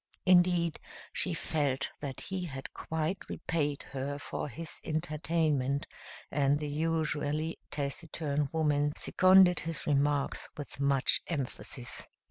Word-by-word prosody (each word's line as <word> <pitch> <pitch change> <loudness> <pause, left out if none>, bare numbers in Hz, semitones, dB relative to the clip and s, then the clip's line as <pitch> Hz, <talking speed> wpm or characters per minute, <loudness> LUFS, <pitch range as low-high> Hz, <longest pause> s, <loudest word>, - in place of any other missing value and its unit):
Indeed, 175 -2 +4 0.3
she 180 -3 +3
felt 145 -5 -1
that 135 -3 -5
he 190 -2 -3
had 135 -4 -7
quite 160 +4 -3
repaid 145 -4 -1
her 140 +1 -3
for 145 - -4
his 165 +2 -4
entertainment, 155 -3 0 0.5
and 140 0 +3
the 150 - -3
usually 155 0 -1
taciturn 145 0 -2
woman 150 -2 +2
seconded 185 -1 +6
his 165 0 -4
remarks 145 -1 +1
with 145 -2 -7
much 140 -1 +3
emphasis. 130 -4 -3
150 Hz, 110 wpm, -31 LUFS, 140-165 Hz, 0.5 s, seconded